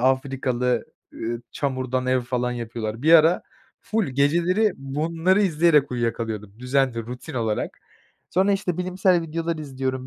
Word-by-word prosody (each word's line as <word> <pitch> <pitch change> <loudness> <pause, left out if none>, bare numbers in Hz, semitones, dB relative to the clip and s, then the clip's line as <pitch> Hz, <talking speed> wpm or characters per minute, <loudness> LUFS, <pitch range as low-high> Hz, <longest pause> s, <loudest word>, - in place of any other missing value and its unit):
Afrikalı, 130 -1 +1 0.3
ııı, 115 +1 -4
çamurdan 130 -2 -2
ev 130 0 +2
falan 125 0 -1
yapıyorlar. 115 -1 -5
Bir 160 +2 +5
ara 165 +2 +6 0.4
ful 220 -1 0
geceleri 170 - +2
bunları 165 +8 +1
izleyerek 155 -5 +3
uyuyakalıyordum. 115 -4 -3
Düzenli, 125 -1 +1
rutin 125 +5 -8
olarak. 110 -3 -2 0.5
Sonra, 190 +3 +3
işte, 185 -3 -1
bilimsel 180 -1 +2
videolar 165 +1 -3
izliyorum 130 -3 -4
135 Hz, 125 wpm, -24 LUFS, 125-170 Hz, 0.5 s, ara